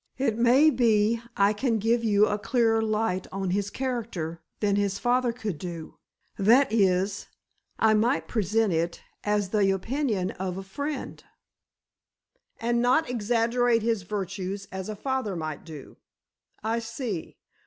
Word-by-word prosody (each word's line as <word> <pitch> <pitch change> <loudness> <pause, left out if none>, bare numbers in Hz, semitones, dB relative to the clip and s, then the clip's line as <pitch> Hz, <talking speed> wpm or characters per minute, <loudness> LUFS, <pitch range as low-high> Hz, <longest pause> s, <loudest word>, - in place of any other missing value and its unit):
It 255 -4 +1
may 250 +7 +5
be 230 -2 +2 0.2
I 200 +1 +4
can 230 +1 0
give 230 +2 +1
you 210 -2 +4
a 210 0 -1
clearer 225 +1 +2
light 215 -4 -1
on 195 -1 -2
his 200 +1 0
character 220 -11 -4 0.2
than 205 -2 +1
his 200 -1 0
father 245 +1 +1
could 215 -9 -5
do——that 195 - 0
is, 195 -1 +1 0.5
I 220 -1 +4
might 230 +6 +1
present 220 -2 +1
it 165 +1 -2 0.2
as 205 -2 0
the 200 -1 +2
opinion 205 -1 -1
of 185 -1 -4
a 195 - -5
friend——" 285 +9 -5 1.4
"And 235 +1 +1
not 250 +3 +2
exaggerate 235 0 +1
his 225 -3 +1
virtues 195 0 -4
as 190 +1 -5
a 215 - -4
father 260 -3 -2
might 155 -3 -5
do? 155 -5 -10 0.7
I 225 +2 0
see. 230 - -5
215 Hz, 140 wpm, -26 LUFS, 195-235 Hz, 1.4 s, may